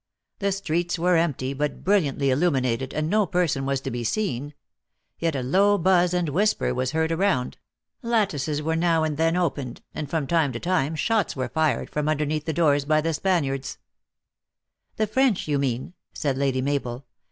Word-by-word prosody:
The 200 -1 0
streets 175 -2 -1
were 180 +2 +2
empty, 140 -5 0
but 145 +1 -3
brilliantly 150 -8 +2
illu 150 +7 +3
minated, 130 -3 -1
and 155 0 -1
no 210 +2 +2
person 165 -7 0
was 135 -1 0
to - - -4
be 120 0 -3
seen; 145 - -2 0.6
yet 165 -3 0
a 130 - -2
low 200 +10 +3
buzz 180 0 +3
and 180 -2 0
whisper 205 +8 +1
was 130 +2 -2
heard 160 0 +1
around; 165 -8 0 0.4
lattices 160 - 0
were 160 +1 0
now 165 -1 +2
and 155 -1 -1
then 165 +1 +2
opened, 145 -8 -2
and 150 -2 -5
from 160 -2 -1
time 155 -3 +1
to 115 - -4
time 165 -3 0
shots 220 +3 0
were 130 -2 -3
fired 160 -1 0
from 150 0 -1
underneath 155 0 -1
the 160 - -1
doors 145 -3 +2
by 155 +2 +2
the 165 +1 -1
Spaniards 145 -6 -1 0.4
" - - -64
" - - -52
The 215 - +2
French," 240 -3 +1
you 145 -2 +1
mean," 130 +3 -2 0.2
said 140 -4 -1
Lady 135 -1 0
Mabel. 135 -2 -2
155 Hz, 185 wpm, -24 LUFS, 135-175 Hz, 0.6 s, illu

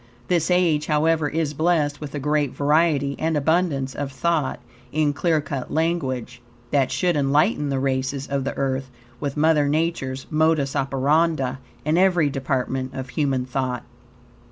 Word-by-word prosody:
This 170 -2 +2
age, 170 -4 +2
however, 155 0 +2
is 155 -1 -1
blessed 155 -2 +1
with 150 -1 -6
a - - -2
great 150 -1 0
variety 145 -1 +2
and 160 -1 0
abundance 145 -3 +1
of 140 -1 -4
thought, 150 +1 0 0.3
in 150 -1 +1
clear 160 +3 +1
cut 140 -2 -5
language, 135 -7 -1 0.3
that 135 -3 +2
should 180 -2 +1
enlighten 145 +3 +2
the 135 - 0
races 135 0 -1
of 140 -1 -2
the 135 - -4
Earth 130 -1 -1 0.3
with 145 -1 -3
Mother 150 -2 +3
Nature's 145 -4 -1
modus 155 -3 +2
operandi 135 0 +1 0.3
in 155 +3 +2
every 175 -6 +3
department 130 -1 -2
of 130 -1 -5
human 135 -3 0
thought. 130 -1 -2
145 Hz, 150 wpm, -23 LUFS, 135-160 Hz, 0.3 s, Mother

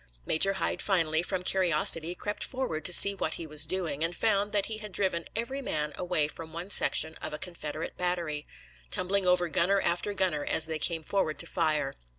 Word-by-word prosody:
Major 195 +5 +2
Hyde 190 - -3
finally, 165 -5 0
from 180 +1 -4
curiosity, 170 -2 +2
crept 205 +3 -5
forward 210 - -3
to - - +4
see 200 +3 +10
what 160 -5 -3
he 165 - -6
was 155 0 +2
doing, 160 -5 -2
and 170 +1 -2
found 205 -1 0
that 205 -1 0
he 220 -1 -5
had 210 -1 -9
driven 185 -3 -2
every 235 +5 -4
man 150 - -3
away 175 -4 -1
from 160 +1 -10
one 175 +4 -7
section 160 -5 +4
of - - -5
a - - -6
Confederate 155 -3 -7
battery, 170 -5 -3 0.4
tumbling 190 - +1
over 180 -1 +2
gunner 185 +4 +1
after 180 +3 -1
gunner 180 -6 -1
as 160 - 0
they 160 -1 -4
came 165 +1 -2
forward 155 -4 -1
to - - +1
fire. 155 -4 -1
175 Hz, 195 wpm, -28 LUFS, 155-195 Hz, 0.4 s, see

